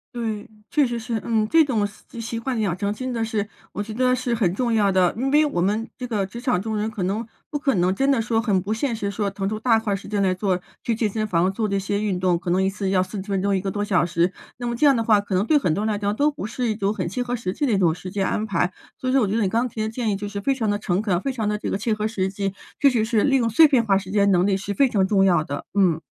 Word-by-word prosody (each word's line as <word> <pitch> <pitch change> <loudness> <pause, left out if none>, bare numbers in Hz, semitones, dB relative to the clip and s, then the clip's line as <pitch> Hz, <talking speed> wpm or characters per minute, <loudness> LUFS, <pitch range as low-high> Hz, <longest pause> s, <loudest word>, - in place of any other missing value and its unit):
对， 220 -3 -4 0.2
确 290 -4 +3
实 240 0 -3
是， 225 -1 -3
嗯， 220 -2 +1
这 325 +6 +5
种 230 -8 0
习 205 +3 -10
习 230 0 -4
惯 240 0 -2
养 195 -5 0
成， 200 +2 -2
真 255 +4 -4
的 230 -1 -1
是 215 -2 -2 0.3
我 205 - -3
觉 215 +1 -7
得 255 +2 +2
是 250 -1 -2
很 210 -7 +2
重 240 -1 0
要 205 -3 +3
的， 185 -2 +3
因 260 +5 -1
为 300 +2 +4
我 230 -12 -1
们 215 +5 0
这 250 - -4
个 210 -4 -1
职 235 +5 -9
场 245 -8 +1
中 220 +2 -3
人， 210 +1 -1
可 210 -4 -4
能 210 +5 -2 0.2
不 295 - -2
可 275 -3 +1
能 180 +1 +2
真 270 +7 +1
的 270 -4 +3
说 225 0 +1
很 200 -4 +1
不 200 +4 -2
现 235 +1 -1
实 200 -2 -3
说， 205 -1 -1
腾 195 0 -3
出 215 +1 -3
大 225 -1 +3
块 215 -3 -2
儿 - - +1
时 195 - -8
间 205 -1 0
来 185 -1 +2
做 185 -1 0 0.2
去 230 - -1
健 220 -1 +1
身 215 +1 -2
房， 180 0 +1
做 215 0 -1
这 200 - 0
些 200 +1 -1
运 195 -4 -1
动， 180 -2 +2
可 175 - -5
能 185 +2 +2
1 190 - +2
次 195 -1 -3
要 185 -1 +3
40 190 0 -6
分 195 -2 0
钟 200 -1 +2
1 185 - 0
个 195 - -2
多 205 +2 -2
小 190 -4 +2
时， 175 +1 +1 0.2
那 245 - -5
么 240 0 -1
这 290 +5 +4
样 275 - +5
的 230 - 0
话， 215 -2 +4
可 200 -2 -3
能 195 +4 +2
对 300 +1 +4
很 160 - 0
多 210 +2 -1
人 215 - +1
来 205 - -3
讲， 205 0 -1
都 295 +5 +2
不 280 -7 -6
是 240 +1 -2
一 215 - 0
种 200 -1 0
很 185 -5 -3
切 220 +8 -3
合 245 0 -2
实 185 -6 -3
际 290 - -1
的 225 - +2
一 - - +3
种 170 -4 +3
时 185 +2 -8
间 195 0 -1
安 215 - -1
排， 180 -1 0 0.2
所 255 - -5
以 255 - +1
说 270 - +4
我 210 - +2
觉 200 - -1
得 225 - +2
你 - - +2
刚 235 +4 +1
提 220 - -9
的 215 0 0
建 225 -1 -2
议 200 - +1
就 205 +1 -5
是 205 0 -5
非 270 +5 +1
常 225 -4 -1
地 205 - -1
诚 195 -1 -1
恳， 185 -4 0
非 275 - -1
常 220 -5 -2
地 210 - 0
这 - - -3
个 - - -1
切 220 +2 -1
合 215 0 -1
实 190 -4 -1
际， 195 0 -3 0.2
确 280 - +6
实 230 -4 +1
是 220 -2 +1
利 270 -1 +3
用 235 -2 +1
碎 310 +8 +6
片 250 -5 +2
化 195 -2 +3
时 190 -1 -2
间 200 0 +3
能 180 +1 +3
力 195 -1 +2
是 200 +1 -4
非 275 +2 +3
常 195 -4 +2
重 195 -2 +3
要 175 -5 +4
的。 145 -1 -6
嗯。 175 -5 +3
210 Hz, 350 characters per minute, -23 LUFS, 195-235 Hz, 0.3 s, 确